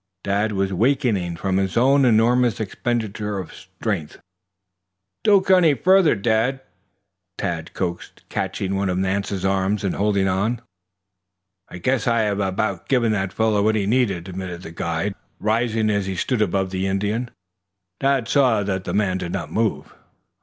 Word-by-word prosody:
Dad 100 Hz, +2 st, 0 dB
was 95 Hz, -1 st, -1 dB
weakening 110 Hz, -6 st, +1 dB
from 95 Hz, +2 st, -1 dB
his 95 Hz, +1 st, -1 dB
own 135 Hz, +3 st, +4 dB
enormous 120 Hz, 0 st, +3 dB
expenditure 110 Hz, -1 st, -2 dB
of 95 Hz, -3 st, -6 dB
strength. 95 Hz, -4 st, -5 dB, 1.1 s
"Don't 200 Hz, -3 st, +4 dB
go 190 Hz, 0 st, +6 dB
any 165 Hz, -5 st, +4 dB
farther, 185 Hz, +1 st, +4 dB
Dad," 115 Hz, +5 st, 0 dB, 0.8 s
Tad 85 Hz, -2 st, -3 dB
coaxed, 85 Hz, -2 st, -4 dB
catching 95 Hz, 0 st, -3 dB
one 100 Hz, 0 st, 0 dB
of 90 Hz, -, -1 dB
Nance's 95 Hz, 0 st, -1 dB
arm 95 Hz, +1 st, +1 dB
and 95 Hz, -, 0 dB
holding 100 Hz, -1 st, +1 dB
on. 105 Hz, +6 st, 0 dB, 1.1 s
"I -, -, -8 dB
guess 125 Hz, +7 st, 0 dB
I 115 Hz, -1 st, +3 dB
have 105 Hz, -2 st, 0 dB
about 95 Hz, +2 st, -1 dB
given 125 Hz, -4 st, +2 dB
the 95 Hz, -2 st, 0 dB
fellow 110 Hz, +2 st, +1 dB
what 110 Hz, +2 st, +2 dB
he 105 Hz, -2 st, 0 dB
needed," 100 Hz, -6 st, +1 dB
admitted 90 Hz, -1 st, -6 dB
the 80 Hz, -, -8 dB
guide, 85 Hz, +3 st, -2 dB, 0.3 s
rising. 110 Hz, 0 st, +1 dB
As 100 Hz, -2 st, 0 dB
he 95 Hz, -, -3 dB
stood 115 Hz, +6 st, -1 dB
above 95 Hz, -2 st, 0 dB
the 95 Hz, 0 st, -1 dB
Indian, 105 Hz, +5 st, -1 dB, 0.7 s
Dad 135 Hz, -3 st, +1 dB
saw 125 Hz, -6 st, +3 dB
that 95 Hz, -1 st, -2 dB
the -, -, -3 dB
man 95 Hz, -3 st, +1 dB
did 90 Hz, -1 st, -4 dB
not -, -, -4 dB
move. 110 Hz, -2 st, -1 dB
105 Hz, 160 wpm, -22 LUFS, 95-115 Hz, 1.1 s, go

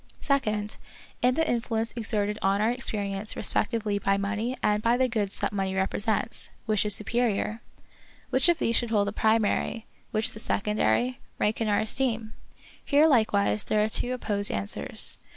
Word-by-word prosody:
Second, 215 Hz, -7 st, -1 dB, 0.4 s
in 250 Hz, +1 st, +3 dB
the 320 Hz, +1 st, +1 dB
influence 230 Hz, -2 st, -1 dB
exerted 210 Hz, -2 st, -1 dB
on 195 Hz, +1 st, +2 dB
our 220 Hz, +2 st, +2 dB
experience 210 Hz, -4 st, -3 dB
respectively 215 Hz, -3 st, 0 dB
by 195 Hz, 0 st, +1 dB
money 215 Hz, +5 st, -2 dB
and 210 Hz, 0 st, +2 dB
by 235 Hz, +2 st, +2 dB
the 260 Hz, 0 st, +3 dB
goods 210 Hz, -5 st, -2 dB
that -, -, -2 dB
money 190 Hz, -1 st, -1 dB
represents, 205 Hz, +3 st, -1 dB, 0.2 s
which 215 Hz, -2 st, +1 dB
is 210 Hz, -, +5 dB
superior 220 Hz, 0 st, 0 dB, 0.3 s
} -, -, -28 dB
Which -, -, +3 dB
of 345 Hz, -, +4 dB
these 230 Hz, -, 0 dB
should 240 Hz, -, +1 dB
hold 205 Hz, -2 st, +2 dB
the -, -, -7 dB
primary, 220 Hz, +1 st, +1 dB, 0.2 s
which 215 Hz, 0 st, 0 dB
the 220 Hz, -, -8 dB
secondary, 215 Hz, -, 0 dB, 0.2 s
rank 215 Hz, +2 st, 0 dB
in 225 Hz, -, +1 dB
our 205 Hz, -1 st, +2 dB
esteem? 225 Hz, -1 st, 0 dB, 0.5 s
Here 290 Hz, +2 st, +4 dB
likewise 215 Hz, -7 st, +2 dB
there 210 Hz, 0 st, +2 dB
are 215 Hz, -, 0 dB
two 245 Hz, +3 st, +1 dB
opposed 205 Hz, -5 st, -1 dB
answers. 100 Hz, 0 st, 0 dB
215 Hz, 170 wpm, -27 LUFS, 205-235 Hz, 0.5 s, is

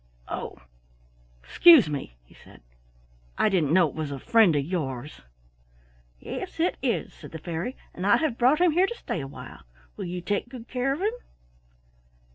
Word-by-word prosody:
"Oh, -, -, -5 dB, 0.9 s
excuse 320 Hz, -, +7 dB
me," 140 Hz, -, -5 dB
he -, -, -21 dB
said. -, -, -18 dB, 0.7 s
"I 215 Hz, -, +3 dB
didn't 170 Hz, -8 st, +1 dB
know 175 Hz, -1 st, +5 dB
it -, -, -9 dB
was 155 Hz, -2 st, -4 dB
a 140 Hz, -, -5 dB
friend 210 Hz, -, +4 dB
of 140 Hz, -1 st, 0 dB
yours." 150 Hz, -5 st, -4 dB, 1.0 s
"Yes, -, -, -7 dB
it -, -, +1 dB
is," -, -, -1 dB
said -, -, -12 dB
the 160 Hz, -, -6 dB
fairy, 170 Hz, -, -5 dB, 0.2 s
"and 185 Hz, +2 st, -3 dB
I 205 Hz, -, +6 dB
have 310 Hz, -7 st, -1 dB
brought 255 Hz, +5 st, +4 dB
him 360 Hz, -2 st, +5 dB
here 360 Hz, +5 st, +3 dB
to 475 Hz, -, -6 dB
stay 170 Hz, -, -4 dB
awhile. 130 Hz, -3 st, -10 dB, 0.3 s
Will -, -, -6 dB
you 180 Hz, +1 st, -4 dB
take 205 Hz, +6 st, -2 dB
good 245 Hz, -2 st, -10 dB
care 255 Hz, +1 st, -1 dB
of 285 Hz, +6 st, -3 dB
him?" 425 Hz, +3 st, +1 dB
185 Hz, 175 wpm, -26 LUFS, -, 1.0 s, excuse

